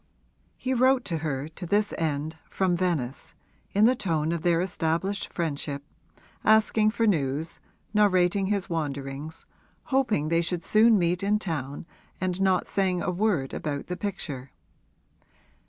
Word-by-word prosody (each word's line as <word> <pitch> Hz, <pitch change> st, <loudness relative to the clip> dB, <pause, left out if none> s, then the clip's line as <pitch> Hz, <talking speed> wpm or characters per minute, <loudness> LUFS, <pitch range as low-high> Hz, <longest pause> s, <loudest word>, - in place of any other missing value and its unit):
He 260 Hz, -, -1 dB
wrote 255 Hz, +1 st, +3 dB
to 165 Hz, -, -1 dB
her, 145 Hz, -2 st, -2 dB
to 175 Hz, +2 st, -8 dB
this 205 Hz, +3 st, +1 dB
end, 155 Hz, 0 st, -2 dB
from 185 Hz, -2 st, +1 dB
Venice, 165 Hz, -8 st, -2 dB, 0.4 s
in 205 Hz, +2 st, +4 dB
the 245 Hz, -, +6 dB
tone 165 Hz, -9 st, -1 dB
of 170 Hz, -1 st, -2 dB
their 170 Hz, 0 st, +3 dB
established 180 Hz, +2 st, -1 dB
friendship, 145 Hz, -4 st, -3 dB, 0.6 s
asking 215 Hz, 0 st, +4 dB
for 230 Hz, +1 st, 0 dB
news, 155 Hz, -5 st, 0 dB, 0.3 s
narrating 190 Hz, -2 st, +3 dB
his 200 Hz, -2 st, 0 dB
wanderings, 145 Hz, -1 st, -4 dB, 0.4 s
hoping 240 Hz, -, +1 dB
they 165 Hz, 0 st, +3 dB
should 170 Hz, 0 st, -2 dB
soon 220 Hz, +3 st, +5 dB
meet 175 Hz, 0 st, +1 dB
in 205 Hz, +2 st, +2 dB
town 150 Hz, -8 st, -4 dB, 0.3 s
and 185 Hz, 0 st, -1 dB
not 190 Hz, -2 st, +3 dB
saying 185 Hz, -2 st, 0 dB
a -, -, 0 dB
word 180 Hz, -8 st, 0 dB
about 145 Hz, -2 st, -3 dB
the 180 Hz, -, -4 dB
picture. 160 Hz, -10 st, -4 dB
175 Hz, 140 wpm, -27 LUFS, 155-205 Hz, 0.6 s, the